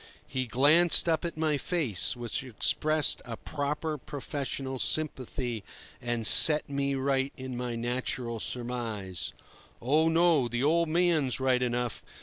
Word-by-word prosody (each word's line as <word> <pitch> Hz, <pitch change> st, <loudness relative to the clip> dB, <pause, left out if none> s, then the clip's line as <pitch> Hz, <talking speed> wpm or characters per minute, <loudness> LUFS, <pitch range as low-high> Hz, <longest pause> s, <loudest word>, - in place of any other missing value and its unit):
He 130 Hz, -1 st, -3 dB
glanced 150 Hz, +10 st, +5 dB
up 165 Hz, 0 st, +1 dB
at 170 Hz, -2 st, -5 dB
my 155 Hz, -2 st, 0 dB
face, 135 Hz, -, -2 dB
which 120 Hz, +1 st, -4 dB
expressed 150 Hz, +5 st, +1 dB
a 115 Hz, -2 st, -7 dB
proper 150 Hz, +1 st, -4 dB
professional 135 Hz, -2 st, -5 dB
sympathy, 130 Hz, -7 st, -3 dB, 0.4 s
and 120 Hz, -2 st, -3 dB
set 150 Hz, +7 st, +7 dB
me 140 Hz, -1 st, -2 dB
right 135 Hz, 0 st, -1 dB
in 130 Hz, -1 st, -7 dB
my 120 Hz, -1 st, -4 dB
natural 120 Hz, 0 st, -3 dB
surmise: 115 Hz, -7 st, -3 dB, 0.5 s
"Oh 155 Hz, +6 st, +2 dB
no; 165 Hz, -5 st, +3 dB
the 120 Hz, +2 st, -3 dB
old 165 Hz, +2 st, +2 dB
man's 160 Hz, -6 st, +1 dB
right 130 Hz, -1 st, +1 dB
enough. 120 Hz, -1 st, -2 dB
135 Hz, 130 wpm, -28 LUFS, 120-155 Hz, 0.5 s, set